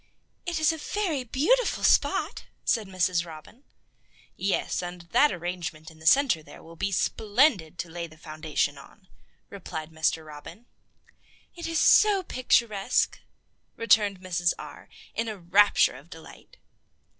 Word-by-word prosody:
"It 345 Hz, -1 st, -1 dB
is 315 Hz, +1 st, +3 dB
a 320 Hz, -, -7 dB
very 330 Hz, -6 st, -2 dB
beautiful 320 Hz, -, +1 dB
spot," -, -, +2 dB, 0.2 s
said 220 Hz, -4 st, +1 dB
Mrs. 185 Hz, -2 st, 0 dB
Robin. 165 Hz, -, -13 dB, 0.7 s
"Yes, 195 Hz, -1 st, -1 dB
and 175 Hz, -1 st, -7 dB
that 295 Hz, -, +5 dB
arrangement 175 Hz, -2 st, -5 dB
in 160 Hz, -, -18 dB
the 160 Hz, -, -6 dB
center 265 Hz, -, +4 dB
there -, -, -14 dB
will 165 Hz, +1 st, -13 dB
be 195 Hz, +4 st, -2 dB
splendid 205 Hz, -, +1 dB
to -, -, -4 dB
lay 170 Hz, +1 st, -6 dB
the 155 Hz, -1 st, -17 dB
foundation 155 Hz, -2 st, -3 dB
on," 185 Hz, +7 st, -17 dB, 0.4 s
replied 165 Hz, -5 st, -7 dB
Mr. 160 Hz, 0 st, -1 dB
Robin. 155 Hz, +8 st, -11 dB, 0.9 s
"It 340 Hz, -1 st, -6 dB
is 330 Hz, 0 st, -1 dB
so 405 Hz, +1 st, +5 dB
picturesque," 235 Hz, -, +1 dB, 0.6 s
returned 205 Hz, -4 st, +2 dB
Mrs. 175 Hz, -2 st, 0 dB
R., -, -, -11 dB, 0.2 s
in 230 Hz, -, -2 dB
a 215 Hz, -2 st, -5 dB
rapture 195 Hz, +1 st, +4 dB
of 140 Hz, +6 st, -14 dB
delight. 160 Hz, -2 st, -14 dB
185 Hz, 140 wpm, -26 LUFS, 160-240 Hz, 0.9 s, that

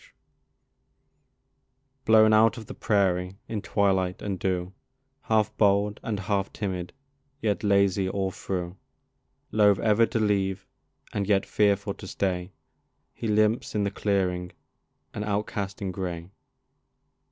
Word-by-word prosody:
COYOTE -, -, -22 dB, 1.9 s
Blown 110 Hz, -1 st, +6 dB
out 110 Hz, +1 st, +5 dB
of 110 Hz, -, -8 dB
the -, -, -8 dB
prairie 95 Hz, -2 st, 0 dB
in 110 Hz, -2 st, -3 dB
twilight 95 Hz, -2 st, +1 dB
and 100 Hz, -3 st, -3 dB
dew, 90 Hz, 0 st, -2 dB, 0.5 s
Half 110 Hz, -1 st, +1 dB
bold 100 Hz, 0 st, +2 dB
and 105 Hz, -3 st, -3 dB
half 100 Hz, -1 st, -1 dB
timid, 95 Hz, -4 st, -4 dB, 0.5 s
yet 105 Hz, -5 st, -1 dB
lazy 100 Hz, -2 st, +2 dB
all 95 Hz, -1 st, -1 dB
through; 90 Hz, 0 st, -4 dB, 0.7 s
Loath 105 Hz, -2 st, +4 dB
ever 110 Hz, +2 st, +3 dB
to -, -, -2 dB
leave, 95 Hz, -2 st, 0 dB, 0.5 s
and 100 Hz, -2 st, -1 dB
yet 100 Hz, -2 st, +2 dB
fearful 100 Hz, -1 st, +1 dB
to 95 Hz, -, -11 dB
stay, 90 Hz, -1 st, -2 dB, 0.6 s
He 115 Hz, -, -5 dB
limps 110 Hz, +2 st, +1 dB
in 105 Hz, -, +1 dB
the 100 Hz, -, -1 dB
clearing, 90 Hz, -3 st, -1 dB, 0.6 s
an 105 Hz, -, -4 dB
outcast 100 Hz, -1 st, -3 dB
in 95 Hz, -, -2 dB
gray. 90 Hz, -1 st, -5 dB
100 Hz, 130 wpm, -26 LUFS, 95-105 Hz, 1.9 s, Blown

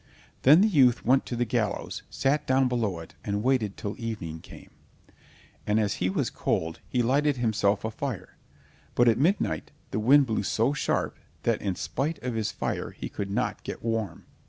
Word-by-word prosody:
Then 150 Hz, +7 st, +7 dB
the 215 Hz, -, +5 dB
youth 135 Hz, -, +4 dB
went 130 Hz, +2 st, +3 dB
to 120 Hz, -, -3 dB
the 120 Hz, +1 st, 0 dB
gallows, 110 Hz, -3 st, -2 dB
sat 140 Hz, +3 st, 0 dB
down 130 Hz, 0 st, +4 dB
below 115 Hz, -7 st, -1 dB
it, 80 Hz, -, -12 dB
and 100 Hz, 0 st, -2 dB
waited 125 Hz, -6 st, +1 dB
till 100 Hz, -, -4 dB
evening 105 Hz, -9 st, -4 dB
came. -, -, -14 dB, 1.0 s
And 105 Hz, +1 st, +3 dB
as 105 Hz, -2 st, 0 dB
he 90 Hz, -, +2 dB
was 95 Hz, -, -1 dB
cold, 80 Hz, 0 st, -1 dB
he 125 Hz, -1 st, +1 dB
lighted 140 Hz, +3 st, +2 dB
himself 105 Hz, -3 st, +1 dB
a 110 Hz, -, -2 dB
fire, 110 Hz, -6 st, -5 dB, 0.6 s
but 120 Hz, -, +4 dB
at 115 Hz, 0 st, +4 dB
midnight 180 Hz, +8 st, +1 dB, 0.2 s
the -, -, -1 dB
wind 135 Hz, +6 st, +6 dB
blew 110 Hz, -4 st, -1 dB
so 115 Hz, +6 st, +1 dB
sharp 150 Hz, -, -1 dB, 0.2 s
that -, -, +1 dB
in 95 Hz, -3 st, -1 dB
spite 150 Hz, -, -2 dB
of 125 Hz, -1 st, -2 dB
his 110 Hz, -1 st, -1 dB
fire -, -, -3 dB
he -, -, -7 dB
could 100 Hz, -1 st, -4 dB
not 100 Hz, -, -1 dB
get -, -, -7 dB
warm. 115 Hz, -6 st, -2 dB
115 Hz, 185 wpm, -27 LUFS, 105-130 Hz, 1.0 s, Then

